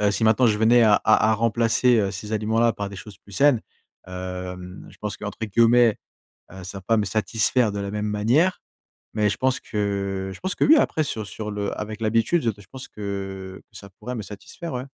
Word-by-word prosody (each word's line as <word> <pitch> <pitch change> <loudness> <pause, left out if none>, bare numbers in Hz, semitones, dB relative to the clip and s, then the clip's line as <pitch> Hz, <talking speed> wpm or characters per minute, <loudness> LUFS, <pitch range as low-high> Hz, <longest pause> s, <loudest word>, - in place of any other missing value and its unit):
heu, 105 -1 +3
si 110 +2 0
maintenant 110 +3 +4
je 105 -2 +2
venais 115 +2 +5
à 110 -2 +5
à 110 +1 +3
à - - +3
remplacer, 115 +2 +2
heu, 100 -2 +1
ces 105 +3 -7
aliments-là 110 +2 +2
par 100 -2 -5
des 100 - -10
choses 100 0 -11
plus 100 - -18
saines, 130 +4 +4 0.5
hem, 90 0 -7
je - - -17
pense 105 -1 -5
qu'entre 105 -1 -7
guillemets, 115 +1 +4 0.5
heu, 95 0 -10
ça 100 +2 -7
va - - -12
pas 115 +5 +1
me 105 - 0
satisfaire 110 +1 +1
de 100 - -4
la 100 - -4
même 105 +1 -3
manière 120 - +1 0.5
mais 105 -1 +2
je 100 - -3
pense 130 0 +1
que 100 -3 -3
je - - -10
pense 185 0 -2
que - - 0
oui. 310 - +7
Après 160 - +2
sur 110 -6 -3
sur 105 +1 -6
le 105 -1 -3
avec 110 +1 -6
l'habitude 115 +9 +1
je 115 - +2
de 105 -1 -15
je - - -19
pense 130 -1 -9
que 95 -2 -6
ça 100 - -12
pourrait 110 +6 -8
me 115 - -4
satisfaire, 105 - -9
ouais. 125 0 -3
105 Hz, 225 wpm, -23 LUFS, 100-115 Hz, 0.5 s, oui